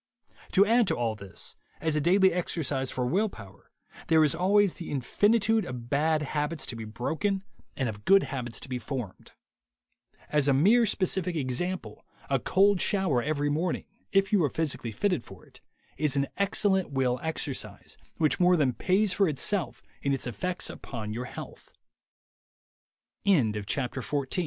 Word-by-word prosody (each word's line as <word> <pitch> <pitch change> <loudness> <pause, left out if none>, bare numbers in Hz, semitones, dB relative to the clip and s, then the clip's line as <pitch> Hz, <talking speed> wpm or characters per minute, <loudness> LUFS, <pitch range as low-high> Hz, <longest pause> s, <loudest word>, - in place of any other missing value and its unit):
To 200 +1 +6
add 230 0 +3
to - - +1
all 115 -2 -1
this, 100 -3 -6 0.2
as 160 -1 -1
a 150 - +1
daily 190 +4 +4
exercise 145 -6 -1
for 125 - -2
will 195 - +1
power, 100 - -14 0.4
there 160 -1 +5
is 150 - +3
always 195 +3 +3
the 170 - -8
infinitude 210 - +2
of 125 -5 -7
bad 155 +2 +2
habits 150 +2 -2
to 120 - -5
be 115 -1 -6
broken 160 - -2 0.3
and 130 - 0
of 105 -2 -6
good 195 - +5
habits 125 -4 -4
to - - -7
be 125 -1 -3
formed. 120 -4 -6 1.0
As 150 -2 +2
a 140 - +4
mere 220 - +5
specific 185 -2 0
example, 160 +7 -3 0.3
a - - +3
cold 195 0 +3
shower 190 - +2
every 145 +1 -1
morning, 160 +3 -1 0.3
if 195 +1 +2
you 195 -5 +4
are 145 - +2
physically 140 -6 -2
fitted 180 - 0
for - - -14
it, - - -20 0.4
is 145 0 +1
an 140 0 +2
excellent 195 -2 +1
will 130 -3 0
exercise, 160 -4 -3 0.2
which 155 +4 +2
more 180 0 +5
than 135 -5 +2
pays 190 - +2
for 195 - +3
it 145 - -4
155 Hz, 140 wpm, -28 LUFS, 130-190 Hz, 1.0 s, To